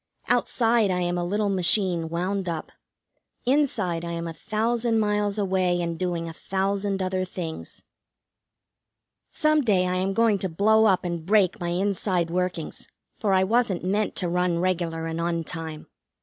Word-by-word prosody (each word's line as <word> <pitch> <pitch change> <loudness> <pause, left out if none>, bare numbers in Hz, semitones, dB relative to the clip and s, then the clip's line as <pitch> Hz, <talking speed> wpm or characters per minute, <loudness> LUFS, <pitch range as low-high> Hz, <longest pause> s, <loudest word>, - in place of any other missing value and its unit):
Outside 230 -3 +2
I 180 -1 0
am 175 0 0
a 175 - -1
little 205 +3 0
machine 180 -3 +1
wound 185 +2 -2
up; 165 -2 -4 0.7
inside 235 - +1
I 170 0 -4
am 170 0 -4
a 165 - -5
thousand 225 +4 0
miles 210 -1 0
away, 185 -3 +1
and 170 -1 -2
doing 175 -2 -2
a 165 - -6
thousand 195 +2 -1
other 185 0 -1
things. 175 -3 -7 1.5
Some 305 0 +2
day 200 -8 +2
I 180 0 0
am 190 +1 0
going 230 -3 +3
to 190 - -2
blow 220 +6 +4
up 190 -3 +3
and 170 -2 -3
break 195 0 +3
my 175 - -2
inside 180 -1 0
workings, 180 -2 -3 0.3
for 210 -3 -1
I 190 0 +4
wasn't 210 -3 +1
meant 205 +3 0
to 180 - -1
run 180 0 +1
regular 170 -2 -1
and 165 0 -3
on 170 -1 -1
time. 160 -2 -6
185 Hz, 165 wpm, -25 LUFS, 170-205 Hz, 1.5 s, blow